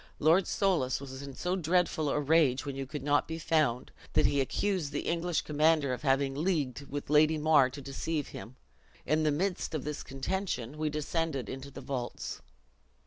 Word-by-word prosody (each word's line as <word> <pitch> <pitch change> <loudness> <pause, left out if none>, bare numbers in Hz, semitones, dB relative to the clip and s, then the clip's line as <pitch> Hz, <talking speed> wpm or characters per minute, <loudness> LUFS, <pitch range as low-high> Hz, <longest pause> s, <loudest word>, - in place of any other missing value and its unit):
Lord 170 +5 +4
Soulis 175 -11 +1
was 135 -1 -8
in 140 -2 -8
so 180 +1 -1
dreadful 170 -3 +1
a 150 - +1
rage, 145 -3 +3
when 140 -1 -4
you 135 -1 -4
could 145 0 -6
not 145 0 +2
be 160 - -4
found, 155 -7 +1 0.2
that - - +4
he 140 - +3
accused 180 +2 -1
the 145 - -2
English 170 0 0
commander 150 -2 +2
of 125 - -5
having 135 -1 +2
leagued 145 -4 -1
with 145 +1 -5
Lady 155 +1 +5
Mar 150 -4 +5
to 140 +2 -8
deceived 145 +2 -3
him. 125 - -9 0.5
In 155 +2 +2
the 155 - +3
midst 180 +2 -1
of 155 - -2
this 150 0 -4
contention 135 - -3
we 155 -1 0
descended 150 -2 -2
into 135 +1 -7
the 140 - -9
vaults." 125 -3 -4
150 Hz, 185 wpm, -30 LUFS, 135-160 Hz, 0.5 s, Lady